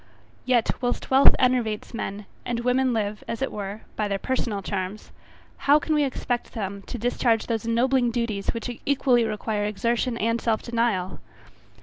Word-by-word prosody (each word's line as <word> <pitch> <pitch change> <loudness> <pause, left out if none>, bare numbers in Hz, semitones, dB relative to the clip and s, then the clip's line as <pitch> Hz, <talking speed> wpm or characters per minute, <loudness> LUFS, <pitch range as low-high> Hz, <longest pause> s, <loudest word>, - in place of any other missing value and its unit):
Yet 245 -3 +3
whilst 245 +1 -2
wealth 265 +1 +7
enervates 245 -5 +1
men; 205 -2 -4 0.2
and 235 -1 -2
women 250 +1 +2
live, 210 -2 -2
as 230 +3 -3
it - - -1
were, 205 +1 -5
by 215 - 0
their 200 -1 -1
personal 210 -2 -2
charms, 190 +2 -4 0.6
how, 290 - +9
can 310 +1 -1
we 300 -1 +3
expect 250 -2 -2
them 200 -2 -4
to - - -5
discharge 235 -1 +1
those 225 -2 -2
ennobling 245 +2 +3
duties 230 -4 -2
which 235 +1 -3
equally 260 -4 +3
require 215 -1 -2
exertion 235 +3 0
and 230 +1 0
self 225 -2 0
denial. 230 -6 0
230 Hz, 160 wpm, -25 LUFS, 210-250 Hz, 0.6 s, how